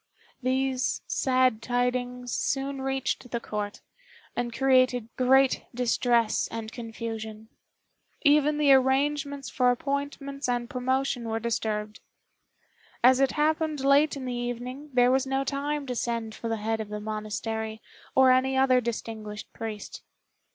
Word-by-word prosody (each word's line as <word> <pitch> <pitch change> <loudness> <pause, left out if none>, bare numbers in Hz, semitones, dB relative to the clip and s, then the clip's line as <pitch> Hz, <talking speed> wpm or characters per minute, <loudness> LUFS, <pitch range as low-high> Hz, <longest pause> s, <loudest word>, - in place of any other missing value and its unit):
These 260 0 0
sad 255 -3 +2
tidings 245 0 -1
soon 275 0 -1
reached 265 -1 -2
the 235 - -2
Court, 210 -2 -5 0.5
and 240 0 -2
created 255 -2 +3
great 265 +1 +3
distress 240 -2 +2
and 225 -1 -6
confusion: 225 -2 -6 0.7
even 295 0 +4
the 290 -2 +6
arrangements 275 +1 +1
for 250 -1 +3
appointments 280 +1 -2
and 240 -1 0
promotion 260 -1 -1
were 225 0 -1
disturbed. 215 -2 -2 1.0
As 255 +1 +6
it 270 -1 +3
happened 310 -1 +1
late 280 +2 +4
in 265 - -6
the 250 - -3
evening 245 +4 -5
there 250 -1 +4
was 265 +1 +2
no 270 0 0
time 285 +1 -2
to 255 - -3
send 230 -2 -2
for 230 - -5
the 225 - -1
head 220 +1 -1
of 215 - -7
the 210 0 -4
monastery, 220 +1 -4 0.4
or 260 -1 +7
any 260 +1 +3
other 260 -1 +4
distinguished 220 -2 -5
priest. 220 -2 -6
250 Hz, 135 wpm, -27 LUFS, 230-270 Hz, 1.0 s, or